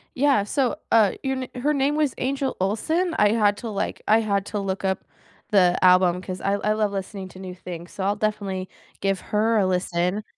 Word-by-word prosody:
Yeah, 270 -6 +3
so, 255 +4 0 0.2
uh, 215 -4 +5
your 265 -1 -1
n 255 - -6
her 295 +3 +2
name 280 +1 +1
was 300 -4 +1
Angel 270 0 -1
Olsen, 315 - 0
I 210 - +5
had 210 -2 +2
to, 230 - -6
like 200 - -3
I 220 +1 +5
had 200 -3 0
to 210 - -3
look 195 -1 -3
up 190 0 -1 0.5
the 180 -4 +4
album 180 -1 +5
'cause 185 0 -6
I 195 - 0
I 210 +1 +1
love 215 -1 0
listening 195 0 -5
to 185 - -13
new 185 -1 -7
things, 175 -1 -8
so 195 - -4
I'll 200 +2 +1
definitely 200 -3 -2 0.3
give 195 -1 0
her 220 +2 +3
a 200 - +3
listen. 180 +2 0
205 Hz, 210 wpm, -24 LUFS, 190-230 Hz, 0.5 s, uh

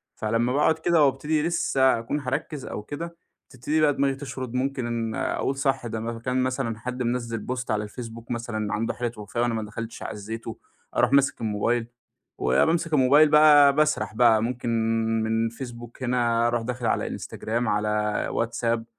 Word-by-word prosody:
فلمّا 115 +3 0
باقعد 160 +2 +2
كده 165 -2 +3
وابتدي 150 +3 0
لسة 135 -7 +2
هاكون 130 +6 -3
هاركّز 135 +2 -4
أو 105 - -6
كده، 170 +7 -7 0.3
تبتدي 145 +4 -1
بقى 145 -1 +4
دماغي 135 0 +1
تشرد. 130 -3 -6
ممكن 120 -4 -2
أقول 135 - -1
صح 135 -3 0
ده 110 0 -4
م 115 +1 -4
كان 125 +2 0
مثلًا 130 -4 -2
حد 125 +1 -4
منزّل 115 -2 -2
post 125 -2 -3
على 105 0 0
الفيسبوك 115 +2 -8
مثلًا 115 -3 -3
عنده 115 +2 -1
حالة 120 -1 -3
وفاة 105 +3 -4
وأنا 120 -1 +1
ما 110 -1 -2
دخلتش 115 +2 -7
عزيته. 110 +2 -6 0.4
أروح 125 +1 +3
ماسك 140 -3 +3
الموبايل، 115 +2 0 0.5
وبامسك 160 - +2
الموبايل 145 +3 +6
بقى 150 -2 +7
باسرح 150 -9 +1
بقى 115 -2 +5
ممكن 120 0 -3 0.5
من 115 +1 +1
الفيسبوك 120 +1 -7
هنا 120 -2 +2
أروح 120 -1 0
داخل 125 +1 -4
على - - +1
إنستجرام 120 +2 -3
على 105 0 +1 0.4
واتساب، 115 0 -1
120 Hz, 160 wpm, -25 LUFS, 115-135 Hz, 0.5 s, بقى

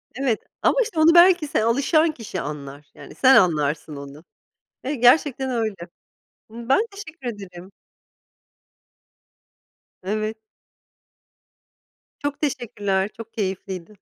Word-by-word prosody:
Evet 260 -4 0 0.2
ama - - +3
işte 345 -7 -5
onu 330 +2 +5
belki 345 -2 +6
se 285 -7 0
alışan 285 +7 +2
kişi 220 - -6
anlar, 145 -1 -8
yani - - -13
sen 265 0 +5
anlarsın 155 -6 +2
onu. 140 +2 -10 0.6
Hani 270 -1 -4
gerçekten 265 +1 +3
öyle. 225 -4 -1 0.8
Ben 235 - 0
teşekkür 335 -10 -8
ederim. 185 -2 -11 2.3
Evet. 215 +3 -3 1.9
Çok 290 +1 -3
teşekkürler, 205 -8 -1
çok 230 0 -10
keyifliydi. 190 -2 -5
225 Hz, 105 wpm, -22 LUFS, 190-280 Hz, 2.3 s, belki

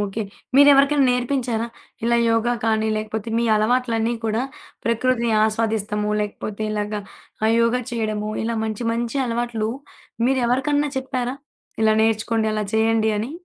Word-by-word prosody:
Okay. 205 +2 -2 0.3
మీరెవరికైనా 280 0 +6
నేర్పించారా? 245 -2 -1 0.4
ఇలా 235 0 +3
యోగా 230 +1 +2
కానీ 220 -1 +1
లేకపోతే 215 0 -4
మీ 235 - +1
అలవాట్లన్నీ 230 +1 +1
కూడా 220 +2 0 0.4
ప్రకృతిని 235 0 +1
ఆస్వాదిస్తము 215 -1 -1
లేకపోతే 210 0 -4
ఇలాగ 210 0 -2 0.5
ఆహ్, 220 - +4
యోగా 230 +2 +2
చేయడము 215 -2 -2
ఇలా 230 0 -1
మంచి 220 +1 -3
మంచి 235 +3 -2
అలవాట్లు 235 -2 -2 0.6
మీరు 265 0 +2
ఎవరికన్నా 285 +4 +1
చెప్పారా? 255 -1 -3 0.5
ఇలా 220 0 +5
నేర్చుకోండి, 225 0 +1
అలా 215 0 -1
చేయండి 220 0 +2
అని? 225 +5 -3
230 Hz, 130 wpm, -22 LUFS, 215-245 Hz, 0.6 s, మీరెవరికైనా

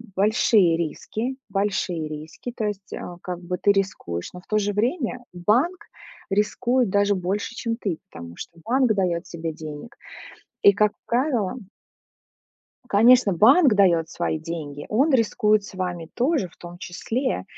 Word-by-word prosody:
большие 200 -3 +4
риски, 220 - -3
большие 195 -5 -1
риски, 155 +10 -7
то 220 - -2
есть 200 -1 -5
а 175 -1 -7
как 180 -1 -4
бы 180 +1 -3
ты 200 - +4
рискуешь, 185 - -2
но 180 - -9
в - - -30
то 215 - +1
же 205 0 -1
время 245 - -1
банк 255 - +1 0.4
рискует 235 +4 +1
даже 200 0 +3
больше, 195 +5 -3
чем 230 -1 -2
ты. 195 -9 -2
Потому 85 0 -9
что 170 - -9
банк 250 -1 +3
даёт 180 -4 0
тебе 165 -1 -5
денег. 155 +6 -9 0.7
И 200 - +8
как 210 +1 +2
правило 240 -4 0 1.3
Конечно, 230 0 +5
банк 260 - +6
даёт 175 -5 +3
свои 160 - -2
деньги. 155 -3 -6
Он 270 +8 +2
рискует 215 -3 +3
с 200 - -11
вами 180 -3 -4
тоже, 255 - +1
в - - -23
том 175 0 -11
числе. 240 +10 -3
200 Hz, 150 wpm, -24 LUFS, 175-235 Hz, 1.3 s, И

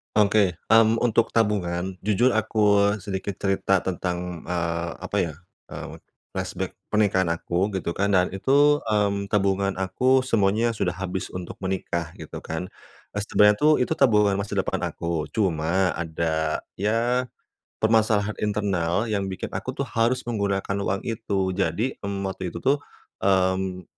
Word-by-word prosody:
Oke. 100 -4 +3 0.2
Mmm, 115 0 +5
untuk 115 -1 +2
tabungan 95 -4 0
jujur 120 +5 +3
aku 105 -2 +3
sedikit 100 0 -4
cerita 95 -1 +2
tentang, 90 -2 -3
eee, 85 -1 -2
apa 95 +2 -3
ya, 85 -4 -1 0.4
eee, - - -7 0.3
flashback - - -4
pernikahan 100 -4 +2
aku 90 +4 -1
gitu 90 -2 -2
kan, 100 +1 +1
dan 90 -1 +3
itu, 140 +9 +4
mmm, 100 -2 +1
tabungan 100 -1 +1
aku 125 +8 +2
semuanya 110 -1 +2
sudah 90 -4 -1
habis 95 0 -4
untuk 90 -1 -6
menikah 90 -4 -3
gitu - - -8
kan. 85 +3 -5 0.5
Eee, - - 0
sebenarnya 105 -1 +4
tuh 155 +1 +5
itu - - 0
tabungan 105 -6 +4
masa 100 0 -4
depan - - 0
aku, 85 -2 -3
cuma 90 -2 +1
ada 80 -1 -1 0.2
ya, 115 +5 +1 0.6
permasalahan 110 -1 +2
internal 100 -1 0
yang 100 -2 0
bikin 95 -1 -5
aku - - -4
tuh - - -1
harus 115 +3 0
menggunakan 100 -4 -1
uang 100 0 -1
itu. 100 -5 -1
Jadi, 105 +6 -1
mmm, 100 -1 -4
waktu 95 -1 -4
itu - - -5
tuh, 140 +2 +3 0.4
mmm, 95 -1 +1
100 Hz, 145 wpm, -24 LUFS, 90-110 Hz, 0.6 s, Mmm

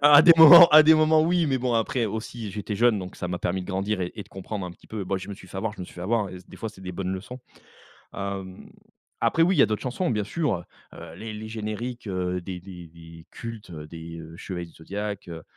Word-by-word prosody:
Ah 145 0 +7
à 145 - +9
des 170 - +9
moments 170 +2 +11
à 155 +1 +9
des 160 +1 +7
moments 155 0 +4
oui! 170 0 +2
Mais 135 -2 0
bon, 125 -1 -1
après 120 +2 0
aussi 110 +1 -6
j'étais 105 +1 -5
jeune, 115 0 +3
donc 90 -1 -8
ça 90 - -4
m'a 90 -1 -3
permis 95 +1 -2
de - - -10
grandir 95 +1 -2
et 90 +4 -4
de - - -23
comprendre 95 0 -6
un 90 - -7
petit - - -21
peu. 105 -3 -5
Bah, 95 +1 -1
je 95 - -9
me 100 - -5
suis 95 - -15
fait 95 - -10
avoir 105 +2 -2
je - - -11
me - - -4
suis - - -15
fait 85 - -9
avoir! 105 +2 0 0.2
Des - - -12
fois, 110 - -5
c'est 105 -3 -14
des 90 -1 -7
bonnes 95 +1 -3
leçons. 105 +7 -7 0.7
Hem, 100 -1 -6 0.5
après 165 - +2
oui, 180 +1 +3
il - - -1
y - - +8
a - - +5
d'autres 110 -1 -3
chansons 140 +7 -2
bien 105 -3 0
sûr. 110 - -2 0.3
Heu, - - -10
les 110 0 -7
les 110 +1 -7
génériques, 110 +2 -5
heu, 90 -1 -2
des 90 0 -7
des 90 -3 -11
des 80 0 -14
cultes 115 -5 -9
des, 80 +1 -9
heu, 80 +1 -11
chevaliers 90 -2 -6
du 85 - -18
zodiaque, 100 +3 -6
heu 80 -2 -8
100 Hz, 260 wpm, -25 LUFS, 90-120 Hz, 0.7 s, moments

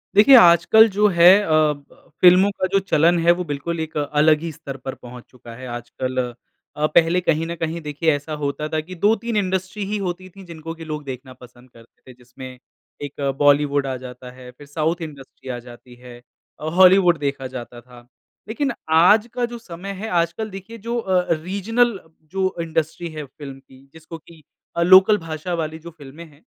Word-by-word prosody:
देखिए, 240 +6 +8
आजकल 175 +4 +6
जो 210 +2 +2
है 170 -4 +3 0.2
अ, - - -5
ब 150 -2 0 0.2
फ़िल्मों 185 +2 +6
का 185 -1 -2
जो 195 - +4
चलन 175 -2 +2
है, 170 +1 +4
वो 175 +1 0
बिल्कुल 160 +3 -4
एक 160 -1 -5
अलग 150 +1 +2
ही 165 0 -5
स्तर 145 -3 -9
पर 130 0 -7
पहुँच 125 0 -12
चुका 120 -2 -14
है 130 +1 -9
आजकल। 120 +2 -6 0.6
अ, 150 - 0
पहले 170 +2 +4
कहीं 165 -2 0
न 170 - -5
कहीं 165 +1 -4
देखिए 150 +1 -1
ऐसा 145 +2 -7
होता 145 +2 -3
था 155 - -1
कि 180 +4 -11
2-3 220 +5 0
इंडस्ट्री 190 +1 -2
ही 210 +2 -3
होती 185 -1 -5
थीं 195 +1 -14
जिनको 165 -1 -8
कि 165 0 -10
लोग 150 -1 -6
देखना 130 -1 -8
पसंद 125 0 -18
करते 115 -1 -21
थे, - - -15
जिसमें 125 +1 -12 0.5
एक 145 0 -7 0.2
बॉलीवुड 145 -1 +3
आ 130 - -3
जाता 125 0 -11
है 125 0 -13
फिर 140 +3 -16
साउथ 160 +4 -2
इंडस्ट्री 140 -4 -10
आ 120 -1 -4
जाती 120 +1 -15
है 120 0 -13 0.4
अ, - - -7
हॉलीवुड 185 -2 +6
देखा 140 -2 -3
जाता 120 -2 -9
था। 120 0 -17 0.4
लेकिन 275 +5 -2 0.2
आज 205 +8 +5
का 245 -1 -1
जो 240 0 -8
समय 195 -2 -8
है 205 +3 -6
आजकल 175 +5 -1
देखिए, 195 +4 -10
जो 230 +2 -4
अ 190 -5 +1
अ, 180 - -10
रीजनल 205 +5 0 0.3
जो 190 0 -1
इंडस्ट्री 160 +1 -3
है 155 -1 -7
फ़िल्म 135 0 -11
की 135 0 -21
जिसको 160 +1 -11
कि 160 0 -18 0.4
अ, - - +1
लोकल 190 +4 +6
भाषा 165 0 -6
वाली 160 -1 -4
जो 170 +1 -11
फ़िल्में 155 +1 -13
हैं, 150 -1 -21
160 Hz, 195 wpm, -21 LUFS, 140-185 Hz, 0.6 s, देखिए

